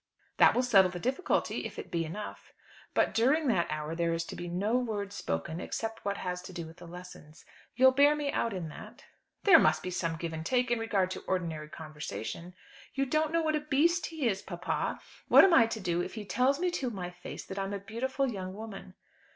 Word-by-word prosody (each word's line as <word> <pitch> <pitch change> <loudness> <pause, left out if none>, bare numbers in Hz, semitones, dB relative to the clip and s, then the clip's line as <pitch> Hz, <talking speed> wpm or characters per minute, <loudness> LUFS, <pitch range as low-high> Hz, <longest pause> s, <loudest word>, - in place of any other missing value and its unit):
"That - - +6
will 250 - +3
settle 195 -7 +5
the 175 0 -6
difficulty; 265 - 0
if - - -7
it - - -7
be 165 -1 0
enough." 205 +7 -7 0.4
"But - - +3
during 270 +8 +3
that 175 -7 +2
hour, 150 +1 -3
there 170 0 0
is 165 0 -1
to - - -7
be 175 - -6
no 195 +7 0
word 210 -5 -2
spoken 80 - -3
except 225 +3 -4
what 200 0 -1
has 180 -1 -3
to 180 - -10
do 170 -2 -5
with 160 +1 -12
the 175 - -11
lessons. 170 -3 -12 0.3
You'll 260 +1 +7
bear 285 +3 +5
me 290 -1 -1
out 230 - 0
in 180 -5 -4
that?" - - -11 0.4
"There 360 -6 +8
must 155 0 +3
be 185 - -3
some 165 -2 -1
give 165 0 -4
and 160 0 -4
take 250 +6 +1
in 240 - +2
regard 200 -5 0
to - - -6
ordinary 165 -5 -2
conversation." 155 +2 -7 0.4
"You 275 0 +1
don't 310 +3 +1
know 335 0 +2
what 310 -1 +1
a - - +1
beast 305 +4 +2
he 315 -6 -2
is, 195 -3 0
papa. 175 -1 -3 0.3
What - - +9
am 385 -3 +6
I 230 -8 +7
to 225 -1 -4
do 175 -3 0
if 185 +4 -5
he 215 -2 -6
tells 255 +7 +2
me 360 0 +1
to 270 -7 -2
my 180 -5 -5
face 180 0 -9
that 195 - -6
I'm 195 0 -2
a 200 - -2
beautiful 260 +7 -2
young 190 -5 -5
woman?" 200 -3 -9
200 Hz, 225 wpm, -30 LUFS, 175-255 Hz, 0.4 s, What